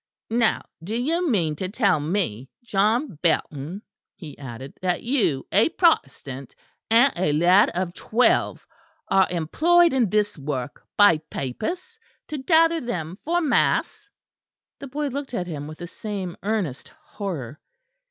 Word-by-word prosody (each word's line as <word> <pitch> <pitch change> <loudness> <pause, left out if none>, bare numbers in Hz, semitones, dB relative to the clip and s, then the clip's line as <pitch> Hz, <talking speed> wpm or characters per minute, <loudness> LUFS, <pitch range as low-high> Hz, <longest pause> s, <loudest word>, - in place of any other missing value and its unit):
"Now 230 -1 +2 0.2
do 210 +6 -4
you 325 +8 0
mean 165 - +1
to 185 +2 -3
tell 200 - +2
me, 145 - -2
John 215 - 0
Belton," 160 +2 -1 0.3
he 160 -7 -10
added, 130 0 -8
"that 180 -1 -1
you, 230 - 0
a 210 +9 +4
Protestant, 140 - 0 0.3
and 240 +5 +5
a 175 -3 +1
lad 180 +7 +5
of 180 -1 -2
twelve, 235 +6 +1 0.4
are 190 -1 +4
employed 320 - +3
on 245 -6 +2
this 210 -3 0
work 135 -2 -5
by 205 -6 +6
papists, 355 - -5 0.3
to 305 -2 -4
gather 330 +3 +3
them 180 -7 -4
for 345 +3 +1
mass?" 380 +6 +1 0.7
The 280 - -7
boy 290 +2 -3
looked 275 -1 -5
at 180 - -2
him 150 -4 -6
with 155 0 -9
the 175 - -7
same 195 -2 -5
earnest 195 - -2
horror. 155 - -7
195 Hz, 140 wpm, -24 LUFS, 155-255 Hz, 0.7 s, by